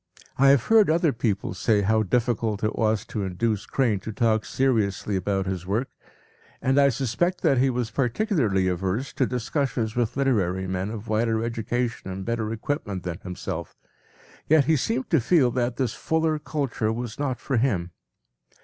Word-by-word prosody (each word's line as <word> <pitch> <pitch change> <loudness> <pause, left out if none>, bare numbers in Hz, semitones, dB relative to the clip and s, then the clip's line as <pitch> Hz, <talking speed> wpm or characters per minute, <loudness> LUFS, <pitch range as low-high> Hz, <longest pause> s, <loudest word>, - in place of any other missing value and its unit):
p> - - -20 0.2
I 135 - +6
have 135 -4 +5
heard 220 -4 +5
other 165 -2 +3
people 110 -4 -1
say 105 -3 +1
how 110 +2 +3
difficult 110 -1 0
it 110 - 0
was 110 -2 +1
to 105 - -4
induce 100 +4 -1
Crane 115 -7 +1
to 110 +3 -6
talk 110 -1 +1
seriously 105 -6 0
about 95 +1 -1
his 95 -2 -4
work, 110 +7 -1 0.7
and 135 +2 +2
I 140 0 +6
suspect 140 +8 -1
that 135 - +3
he 135 +1 +3
was 120 -2 -2
particularly 120 - +1
averse 95 +8 -2
to 130 - +1
discussions 125 -2 -2
with 120 +1 -1
literary 95 -9 +1
men 95 +1 -2
of 110 0 -7
wider 110 +1 +1
education 115 -1 -2
and 95 0 -5
better 115 -2 -2
equipment 110 - -3
than 90 -2 -4
himself, 90 -2 -6 0.7
yet 155 -2 +5
he 160 - +3
seemed 230 - -1
to 160 - +5
feel 130 -1 +3
that 120 0 -1
this 125 -4 0
fuller 160 -1 0
culture 140 -8 -2
was 120 +1 -5
not 135 -4 -1
for 135 -4 -1
him. 95 -8 0
115 Hz, 175 wpm, -25 LUFS, 105-135 Hz, 0.7 s, I